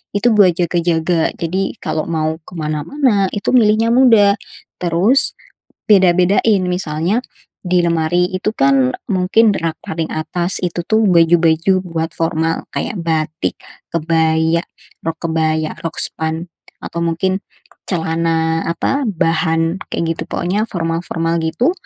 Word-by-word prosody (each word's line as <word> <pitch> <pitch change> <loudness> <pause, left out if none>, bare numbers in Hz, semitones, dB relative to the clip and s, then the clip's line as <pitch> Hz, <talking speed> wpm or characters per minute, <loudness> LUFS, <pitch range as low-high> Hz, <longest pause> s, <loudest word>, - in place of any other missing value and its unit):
itu 205 +4 +2
buat 195 -3 +6
jaga-jaga. 170 -1 0
Jadi, 190 +6 -2
kalau 155 0 -2
mau 160 -1 -1
ke - - -16
mana-mana 195 - 0
itu 205 -1 -2
milihnya 220 -1 +4
mudah, 220 -6 +5 0.5
terus 180 +10 +2 0.6
beda-bedain, 190 +1 +4
misalnya 180 +3 -1 0.5
di 180 0 +2
lemari 170 +1 +1
itu, 185 +3 -2
kan, 135 -2 +3 0.2
mungkin 195 +4 +3
rak 165 -1 -2
paling 160 0 -3
atas 175 +3 -2
itu, 175 -1 -2
tuh, 220 0 +2
baju-baju 170 +1 +3
buat 165 -2 -4
formal, 165 0 -1
kayak - - -3
batik, 160 -1 -2 0.4
kebaya, 160 0 +1 0.4
rok 165 0 -3
kebaya, 160 -1 0
rok 165 -2 -5
span, 160 +1 0 0.4
atau 170 - -5
mungkin 185 +3 -1 0.5
celana, 165 -1 0
apa, 270 - -1
bahan 165 -2 0 0.2
kayak, 165 -1 -1
gitu, - - -5
pokoknya 195 +5 -1
formal-formal, 165 -1 -2
gitu, 160 - +1
170 Hz, 120 wpm, -17 LUFS, 160-185 Hz, 0.6 s, buat